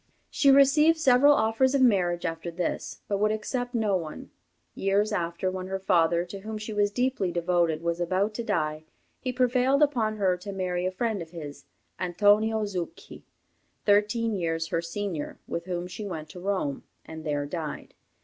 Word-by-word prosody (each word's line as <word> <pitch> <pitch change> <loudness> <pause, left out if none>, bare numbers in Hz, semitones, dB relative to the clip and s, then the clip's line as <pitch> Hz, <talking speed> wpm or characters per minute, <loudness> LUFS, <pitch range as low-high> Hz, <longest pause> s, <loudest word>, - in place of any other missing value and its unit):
She 280 - +3
received 285 +4 +6
several 285 0 +5
offers 255 +4 +2
of 275 - +3
marriage 180 -7 +2
after 165 0 -3
this, 170 0 -4
but 200 -1 -1
would 215 +1 +2
accept 245 +3 -3
no 215 -4 +1
one. 160 -4 -5 0.4
Years 200 +2 +1
after, 175 -1 -1
when 185 0 -5
her 190 0 -2
father, 175 -3 +2
to 195 +3 -8
whom 215 +2 -6
she 215 +1 -6
was 205 -1 +2
deeply 245 -4 0
devoted, 170 -2 +1
was 170 0 -1
about 190 +5 0
to 235 - -4
die, 155 -8 -1 0.4
he 255 - -3
prevailed 255 +3 +3
upon 235 -7 +1
her 185 -3 +2
to 195 +3 -7
marry 180 -2 -2
a - - -1
friend 220 0 -2
of 165 - -8
his, 150 -4 -9 0.3
Antonio 210 +4 +3
Zucchi, 185 -4 -6 0.6
thirteen 210 +2 +2
years 165 -4 -2
her 165 - 0
senior, 170 -2 -4
with 170 0 -4
whom 175 -1 -3
she 185 +4 -6
went 160 -4 -6
to 180 - -10
Rome, 185 -7 -2 0.2
and 160 0 -9
there 145 -2 -1
died. 155 0 -6
195 Hz, 175 wpm, -27 LUFS, 170-220 Hz, 0.6 s, received